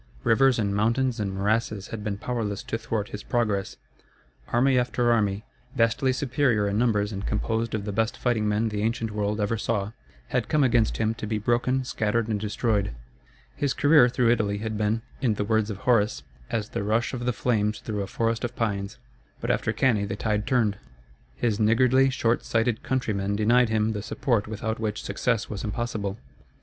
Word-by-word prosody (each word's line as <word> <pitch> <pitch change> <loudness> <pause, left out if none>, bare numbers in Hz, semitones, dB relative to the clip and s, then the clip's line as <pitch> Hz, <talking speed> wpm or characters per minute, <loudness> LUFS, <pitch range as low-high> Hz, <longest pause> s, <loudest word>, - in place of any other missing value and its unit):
Rivers 130 +2 +4
and 100 -3 0
mountains 115 +3 +1
and 100 -2 -1
morasses 105 +1 -1
had 110 -2 -6
been 105 -1 -2
powerless 110 -3 -3
to 115 - -3
thwart 115 -2 -3
his 105 - -6
progress. 105 -5 -1 0.7
Army 130 +2 +3
after 120 -1 +1
army, 105 -2 +1 0.3
vastly 115 +3 +2
superior 130 -5 +1
in 100 +1 0
numbers 105 -3 +1
and 100 -1 -5
composed 110 +2 -1
of 100 -2 -3
the 105 - -2
best 110 +2 0
fighting 115 -4 0
men 110 +2 +1
the 105 -1 -3
ancient 115 0 -1
world 105 0 -1
ever 105 +1 0
saw, 105 -2 -1 0.4
had - - -1
come 150 -2 +3
against 120 -4 +2
him 110 0 +1
to 110 - -6
be 110 0 -1
broken, 120 +4 +1
scattered, 115 -2 -1
and 105 -2 0
destroyed. 105 - -1 0.6
His 140 -2 -1
career 145 -3 +6
through 120 -1 +2
Italy 105 -4 +1
had 110 +1 -4
been, 105 +2 0 0.2
in 120 -6 +2
the 105 - -1
words 110 0 +1
of 105 - -4
Horace, 105 - +1 0.3
as 110 -1 -2
the - - -3
rush 110 +5 0
of 120 -1 -4
the - - +3
flames 105 -2 0
through 105 -2 -4
a 100 - -3
forest 115 +2 -1
of 120 0 -3
pines. 100 0 -2 0.4
But - - -1
after - - 0
Cannæ 110 -6 +1
the 100 - -3
tide 105 -1 -1
turned. 110 -6 +2 0.6
His 105 - 0
niggardly, 130 +5 +4
short 120 -3 0
sighted 115 0 0
countrymen 100 -6 -1
denied 115 +3 +3
him 110 0 +1
the 105 - -3
support 110 0 -1
without 110 +1 -3
which 105 -2 -3
success 115 +3 -1
was 105 -2 -5
impossible. 105 -2 -3
110 Hz, 185 wpm, -26 LUFS, 105-120 Hz, 0.7 s, career